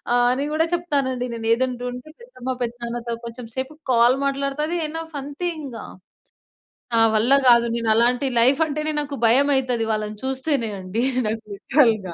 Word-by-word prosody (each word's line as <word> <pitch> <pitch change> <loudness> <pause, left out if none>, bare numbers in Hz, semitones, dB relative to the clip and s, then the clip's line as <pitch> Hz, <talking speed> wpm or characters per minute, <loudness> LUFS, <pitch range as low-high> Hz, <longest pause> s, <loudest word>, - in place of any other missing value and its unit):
ఆహ్, 245 0 +4
అని 275 +3 -2
కూడా 320 +2 +2
చెప్తానండి 275 -7 -1
నేను. 225 -1 -5
ఏదంటూంటే, 250 +2 -3
పెద్దమ్మ, 475 - -8
పెద్దనాన్నతో 235 0 -4
కొంచెం 235 0 -8
సేపు 265 +3 -4 0.2
కాల్ 240 +2 +4
మాట్లాడుతాది. 275 +4 -1
ఎనఫ్ 325 0 -7
అంతే 290 +6 -4
ఇంగా. 245 -6 -7 1.1
నా 230 - +4 0.2
వల్ల 240 +5 +3 0.2
కాదు. 235 0 +6
నేను 230 -1 -1
అలాంటి 245 +4 +3
లైఫ్ 260 +5 +4
అంటేనే 305 0 -2
నాకు 285 -1 -5
భయం 275 +5 +4
అయితది 250 -3 0
వాళ్ళని 215 -1 -3
చూస్తేనే 265 -2 -1
అండి 190 +6 -3 0.2
నాకు 220 +1 -3
లిట్‌రల్‌‌గా. 215 - +2
250 Hz, 150 wpm, -22 LUFS, 235-285 Hz, 1.1 s, కాదు